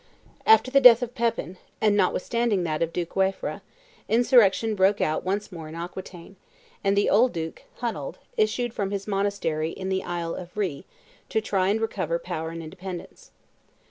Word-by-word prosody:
After 440 -12 +6
the 275 0 +5
death 250 -1 +9
of 245 0 -5
Pepin, 230 -6 -2 0.2
and 210 -2 +3
notwithstanding 205 +1 +1
that 155 -2 -2
of 165 0 0
Duke 175 -1 -4
Waifre, 190 0 -1 0.5
insurrection 225 -2 +4
broke 195 0 +3
out 155 - 0
once 200 +3 -2
more 165 -3 -8
in 160 - -9
Aquitaine; 175 +2 -8 0.5
and 200 0 +2
the 205 - +3
old 240 +5 +4
duke, 160 -2 -5 0.2
Hunald, 245 - -3 0.2
issued 250 - 0
from 200 -4 -2
his 200 -1 -3
monastery 195 -6 -1
in 190 +2 -5
the 190 0 -1
island 170 0 -4
of 180 +2 -13
Rhe 175 -10 -2 0.4
to 220 - +1
try 195 -4 0
and 210 +3 +2
recover 185 -7 -1
power 160 -2 -5
and 165 0 -7
independence. 180 +3 -9
195 Hz, 170 wpm, -25 LUFS, 175-220 Hz, 0.5 s, death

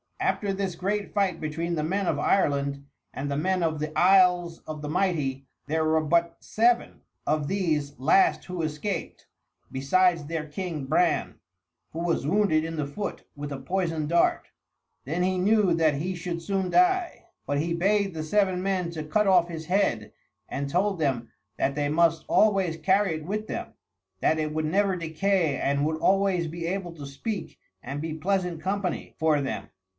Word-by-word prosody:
After 200 -2 0
this 195 -1 -2
great 200 +3 -2
fight 195 -5 +1
between 165 +3 -3
the 155 - -1
men 195 +5 -1
of 155 - +1
Ireland 140 -4 +1 0.3
and 140 +2 -4
the 140 - -1
men 185 +4 +1
of 160 -2 0
the 155 +1 -4
Isles 180 -2 +4
of 155 -1 -6
the 150 - -5
Mighty 150 -7 0 0.2
there 160 +1 +1
were 160 0 +3
but 170 +2 +1
seven 235 +2 +1 0.2
of 150 -1 0
these 155 -7 -1
last 155 +8 +3
who 180 -2 -4
escaped, 155 +6 -4 0.4
besides 170 +4 +2
their 160 0 -3
king 155 -2 -4
Bran, 160 +4 +1 0.6
who 160 - -6
was 170 -4 0
wounded 165 -3 +3
in 165 0 -4
the 150 - -1
foot 200 +9 -5
with 145 0 -6
a 140 - -4
poisoned 165 0 -2
dart. 170 0 +2 0.6
Then 165 +6 -1
he 185 0 +1
knew 205 -1 +3
that 160 -3 +3
he 180 +6 -2
should 170 0 -4
soon 190 +1 -1
die, 360 -1 +2 0.2
but 145 0 0
he 170 +3 -1
bade 195 +2 +1
the 155 -1 -4
seven 185 +2 +1
men 185 -2 -1
to 160 -2 -5
cut 195 +7 +1
off 180 -2 +4
his 160 -2 -6
head 170 - 0 0.4
and 140 0 -3
told 190 +4 +1
them 130 -6 -1 0.3
that 140 - +1
they 145 -1 0
must 165 +1 +2
always 195 -6 +3
carry 190 +2 +2
it 155 -1 -7
with 215 +4 -3
them - - -5 0.5
that 160 +9 +2
it 155 -1 -1
would 155 0 -1
never 195 +4 +2
decay 165 -2 0
and 140 +2 0
would 155 +1 0
always 190 -1 +2
be 165 +1 -5
able 180 -1 -3
to 145 -3 -8
speak 165 +8 -5 0.2
and 140 +3 -5
be 160 0 -3
pleasant 180 0 -1
company 190 0 -3
for 155 -2 +2
them. 135 - -4
170 Hz, 180 wpm, -26 LUFS, 155-190 Hz, 0.6 s, Isles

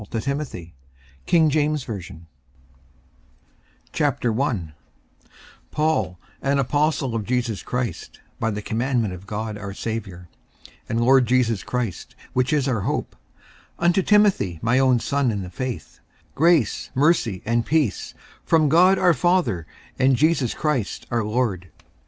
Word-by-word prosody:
Amen. 105 - -11
BOOK 115 - -2
54 70 - -3
1 160 - +4
Timothy 120 - -2 1.7
54:001:001 115 - 0 1.0
Paul, 155 - 0 0.2
an 140 +1 +1
apostle 145 -1 0
of 115 -2 -2
Jesus 120 -2 -1
Christ 125 -1 -4 0.2
by 115 - 0
the 105 -1 -4
commandment 115 -3 -1
of 90 +2 -11
God 105 0 -4
our 100 -1 -7
Saviour, 100 -7 -5 0.6
and 115 - 0
Lord 130 0 +5
Jesus 115 -4 +2
Christ, 120 -7 -4 0.2
which 130 0 +1
is 145 -3 +1
our 120 -6 0
hope; - - -3 0.6
54:001:002 170 - -3
Unto 175 +2 +4
Timothy, 195 - +3
my 120 +3 +3
own 130 -2 +4
son 140 +1 0
in 100 -3 -2
the 90 - -8
faith: 130 +4 -6 0.3
Grace, 160 - +2
mercy, 130 - +2
and 115 +1 +1
peace, 150 -8 0 0.3
from 155 -3 +3
God 180 +5 +5
our 180 -2 +4
Father 140 - +1 0.3
and 130 0 +4
Jesus 150 -3 +1
Christ 145 -9 -2
our 120 -2 +1
Lord. 105 -5 -1
125 Hz, 135 wpm, -23 LUFS, 105-145 Hz, 1.7 s, Lord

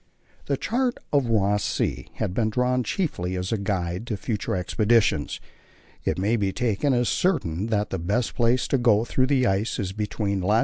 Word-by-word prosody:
The 140 - 0
chart 245 - 0 0.2
of 140 -4 +3
Ross 105 -2 +2
Sea - - -1
has - - -2
been 110 +3 0
drawn 125 +2 +1
chiefly 100 - -2
as 90 +1 -3
a 110 - +1
guide 95 +1 -2
to 110 - -2
future 100 -4 -2
expeditions. 100 -3 +1 0.6
It - - 0
may 105 +5 +1
be 100 -3 0
taken 120 +5 0
as 120 -2 +2
certain 100 - 0
that 105 -2 0
the 95 - -2
best 105 +9 -1
place 120 +1 +2
to 135 - +2
go 115 -2 +4
through 130 +2 +1
the 135 -2 +2
ice 100 +1 0
is 95 -4 -2
between 105 -1 -2
long. 105 +5 +3
110 Hz, 185 wpm, -25 LUFS, 95-125 Hz, 0.6 s, go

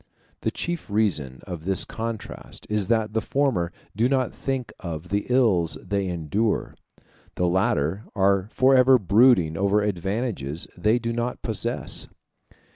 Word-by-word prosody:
The - - -1
chief 175 -6 -4
reason 85 -12 0
of 85 -5 -6
this 95 +1 +2
contrast 115 -1 -6
is 105 -3 0
that 110 -2 +1
the 110 - +1
former 110 -10 0 0.2
do 115 +4 +2
not 130 -2 +1
think 130 -5 -3
of 85 -1 -6
the 100 0 -1
ills 110 -10 +3
they 100 -1 -2
endure 90 +6 -1 0.6
the 90 - +1
latter 90 +1 +1
are 100 -1 +2
forever 130 +1 +5
brooding 100 -5 +4
over 100 +3 +2
advantages 95 - -2
they 105 +6 +2
do 115 -1 -2
not 120 +1 -3
possess. 110 -3 -2
105 Hz, 135 wpm, -24 LUFS, 90-120 Hz, 0.6 s, forever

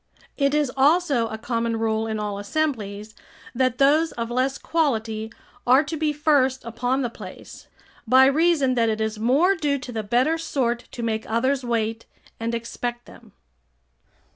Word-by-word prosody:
It 280 0 +1
is 295 -4 +1
also 280 -3 +3
a 220 - -6
common 230 0 -2
rule 220 0 0
in 220 -1 -3
all 205 -1 -3
assemblies, 215 -4 -3 0.4
that 255 0 +1
those 300 +4 +4
of 235 0 -4
less 260 +2 0
quality 225 -9 -1 0.4
are 260 +4 +6
to 315 +2 -5
be 310 -1 0
first 285 -4 +1
upon 245 +3 -1
the 245 - -1
place, - - -11 0.4
by 260 +3 +7
reason 290 -1 +3
that 230 -2 +2
it 215 0 -1
is 220 0 -2
more 280 - +3
due 290 -4 0
to 255 -2 -8
the 225 -2 -3
better 250 +10 +1
sort 245 -7 -1
to 240 - -5
make 220 -1 -2
others 260 +4 +1
wait 225 -1 -2 0.3
and 230 +1 -2
expect 240 +1 -5
them. - - -16
245 Hz, 165 wpm, -23 LUFS, 225-280 Hz, 0.4 s, by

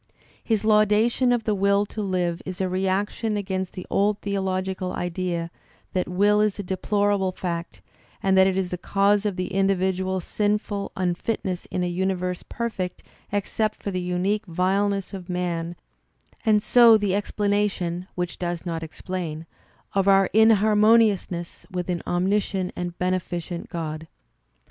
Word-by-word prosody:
'' - - -31
His 215 -1 +2
laudation 215 +4 +4
of 240 -2 +1
the 215 - +1
will 200 +1 +2
to 215 - -6
live 180 -4 -1
is 185 +1 -6
a 190 - +1
reaction 195 +4 -1
against 190 -2 -3
the 185 - -7
old 205 +1 +2
theological 190 -2 -2
idea 175 -1 -2 0.4
that 185 - 0
will 205 +3 +3
is 210 -2 +1
a 205 - -4
deplorable 200 +1 0
fact, 170 - -5 0.4
that 190 -1 +5
it 190 -1 0
is 185 -2 -1
the 180 - -3
cause 200 +2 +2
of 200 - -2
the 185 0 -4
individual's 190 -1 +1
sinful 205 -1 -1
unfitness 185 +1 -2
in 180 - -2
a - - 0
universe 180 0 -1
perfect 220 -6 -4 0.3
except 210 +2 -1
for 200 - -2
the 185 -1 -2
unique 185 +4 -1
vileness 195 +3 0
of 185 -2 -7
man 175 -1 -2 0.7
and 215 -3 +3
so 235 -2 +7
the 205 -3 0
ex 205 +1 -1
planation 200 -4 0
(which 180 -1 -3
does 175 -1 -3
not 165 -2 -3
explain) 165 -1 -5 0.5
of 195 -1 +1
our 195 -1 +5
inharmoniousness 215 -4 +3
with 180 -2 -4
an 175 - -2
omniscient 190 +1 0
and 175 -1 -4
beneficent 180 -1 -2
god. 160 -1 -5
190 Hz, 150 wpm, -24 LUFS, 180-205 Hz, 0.7 s, so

